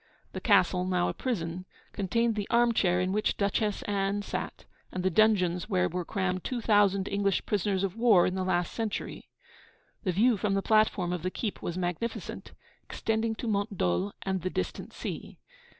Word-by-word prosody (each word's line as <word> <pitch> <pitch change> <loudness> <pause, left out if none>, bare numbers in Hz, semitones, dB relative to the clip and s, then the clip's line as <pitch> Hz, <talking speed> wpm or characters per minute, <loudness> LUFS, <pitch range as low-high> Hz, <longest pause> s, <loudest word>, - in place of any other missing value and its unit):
The - - -5
castle, 180 -1 +3
now 180 -1 +1
a - - -2
prison, 185 -7 -3 0.3
contained 230 +4 +1
the 210 -2 -3
arm 235 0 +4
chair 180 -4 +2
in 185 +1 0
which 210 +2 0
Duchess 205 +1 0
Anne 200 0 -1
sat, - - -5 0.3
and 185 - -3
the 185 - +2
dungeons 185 -3 +3
where 185 -3 +2
were 180 +1 -3
crammed 185 -2 -2
two 250 - -2
thousand 205 -3 +3
English 200 -1 0
prisoners 200 -1 0
of 195 -1 -2
war 225 -6 +5
in 180 - 0
the 190 0 -1
last 175 -2 0
century. 225 -3 -4 0.7
The 190 - +1
view 220 +5 +3
from 195 +1 0
the 195 - 0
platform 215 -5 +2
of 180 - -3
the 185 - -1
keep 210 +2 -4
was 175 - -4
magnificent, 180 +6 -4 0.3
extending 225 0 -1
to 235 - -5
Mont 205 -1 -1
Dol 90 - 0
and 190 -1 -1
the 185 - -2
distant 90 - -4
sea. - - -6
195 Hz, 180 wpm, -29 LUFS, 180-215 Hz, 0.7 s, war